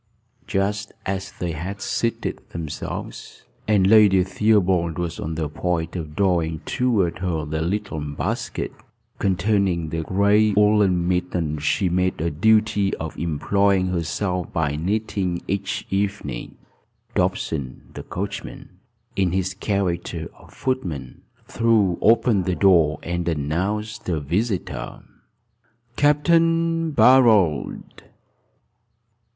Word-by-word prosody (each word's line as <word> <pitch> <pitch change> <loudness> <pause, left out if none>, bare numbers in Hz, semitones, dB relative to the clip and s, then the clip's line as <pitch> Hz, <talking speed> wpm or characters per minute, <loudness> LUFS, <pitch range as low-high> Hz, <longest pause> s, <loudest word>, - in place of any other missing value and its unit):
Just 105 0 -1
as 95 0 -3
they 90 -1 -4
had 90 +6 -5
seated 115 +2 -2
themselves, 80 -3 -7 0.2
and 105 -3 +4
Lady 100 -2 +6
Theobald 95 -4 +2
was 85 -1 -3
on 80 +1 -4
the 80 -1 -2
point 80 +2 -2
of 75 -4 -5
drawing 85 -5 +1
toward 105 -9 0
her 85 -4 -2
the 80 +1 -3
little 85 -2 -2
basket 75 -1 -3 0.5
containing 95 -3 +1
the 80 +1 -2
gray 100 +5 +3
woollen 105 -4 +3
mittens 85 -4 -1
she 90 +5 +1
made 90 +1 0
a 85 +2 -1
duty 105 +3 +2
of 80 - -6
employing 95 +4 +1
herself 90 +1 -2
by 75 -3 0
knitting 95 +1 -2
each 100 0 -2
evening, 100 -10 -3 0.6
Dobson, 65 -5 -2
the - - -7
coachman, 100 +2 -6 0.5
in 95 -3 +1
his 95 0 0
character 90 -5 -2
of - - -18
footman, 85 - -4 0.3
threw 110 -6 +2
open 115 -2 +4
the 90 - 0
door, 85 -7 +4
and 85 0 -3
announced 95 +9 -2
a 80 -3 0
visitor. 95 - -3 0.9
"Capt. 145 0 +3
Barold." 160 - +4
95 Hz, 110 wpm, -23 LUFS, 85-105 Hz, 0.9 s, Lady